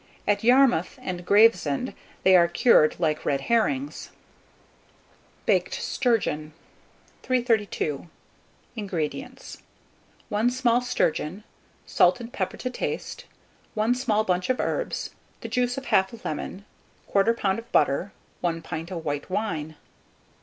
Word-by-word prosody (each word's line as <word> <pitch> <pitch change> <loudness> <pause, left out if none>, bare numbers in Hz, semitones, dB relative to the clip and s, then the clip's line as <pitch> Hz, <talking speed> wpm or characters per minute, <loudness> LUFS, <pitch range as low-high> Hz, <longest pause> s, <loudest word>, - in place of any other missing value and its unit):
At 205 0 +1
Yarmouth 245 -7 +4
and 180 -1 -4
Gravesend 205 - +4 0.3
they 190 0 +6
are 170 -1 +6
cured 170 -3 +4
like 155 -3 0
red 140 -1 0
herrings. 260 - 0 1.4
BAKED - - +1
STURGEON. 155 - -1 0.7
332. 220 - 0 0.7
INGREDIENTS. 205 - -5 0.7
1 215 +2 +2
small 245 -1 +2
sturgeon, 200 -6 -1 0.4
salt 260 - +3
and 235 +1 -9
pepper - - -3
to 255 - -4
taste, - - -4 0.5
1 220 +3 +2
small 235 -4 +1
bunch 180 -1 -1
of 255 - +1
herbs, - - -2 0.3
the - - -5
juice 250 0 0
of 270 - -5
1/2 190 +1 +1
lemon, 185 +6 -5 0.5
1/4 205 +4 +4
lb. 195 0 0
of 230 - -13
butter, 150 +7 +2 0.3
1 165 -1 -2
pint 165 0 -5
of 170 -3 -5
white 145 +2 -3
wine. 160 -6 -3
205 Hz, 120 wpm, -25 LUFS, 170-245 Hz, 1.4 s, they